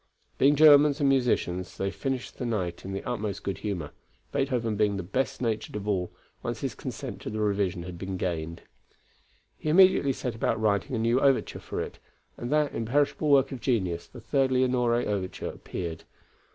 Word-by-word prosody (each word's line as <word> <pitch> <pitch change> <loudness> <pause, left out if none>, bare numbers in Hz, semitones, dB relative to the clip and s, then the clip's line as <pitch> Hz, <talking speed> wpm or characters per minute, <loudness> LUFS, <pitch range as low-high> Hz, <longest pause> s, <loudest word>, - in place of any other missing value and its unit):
Being 140 +2 +5
Germans 145 -1 +7
and 145 - +3
musicians, 120 -9 +1
they 95 0 -1
finished 130 +2 -4
the 125 - -2
night 90 -7 -2
in 95 - -6
the 95 - -4
utmost 105 -5 -3
good 100 - -3
humor, 90 -9 -4 0.4
Beethoven 125 -6 0
being 105 -1 +1
the 95 - -3
best 125 +8 -2
natured 110 -3 -2
of 105 0 -4
all, 95 -4 0 0.3
once - - -4
his - - -2
consent - - -6
to - - -5
the 110 +1 -4
revision 100 -4 0
had 90 -1 -8
been 95 0 -4
gained. 85 -2 -3 1.0
He 155 - -2
immediately 175 -5 +5
set 125 -1 -4
about 110 - 0
writing 105 +2 +1
a - - 0
new 115 +3 +2
overture 135 -2 +2
for - - -5
it, - - -7 0.4
and 120 +2 -5
that 150 -1 +2
imperishable 145 +6 +1
work 135 -1 +5
of 130 -3 -6
genius, 95 -9 0
the 125 - -12
Third 135 +3 +1
Leonore 125 -2 +2
overture 100 -6 -2
appeared. 85 -3 -6
115 Hz, 180 wpm, -27 LUFS, 95-135 Hz, 1.0 s, Germans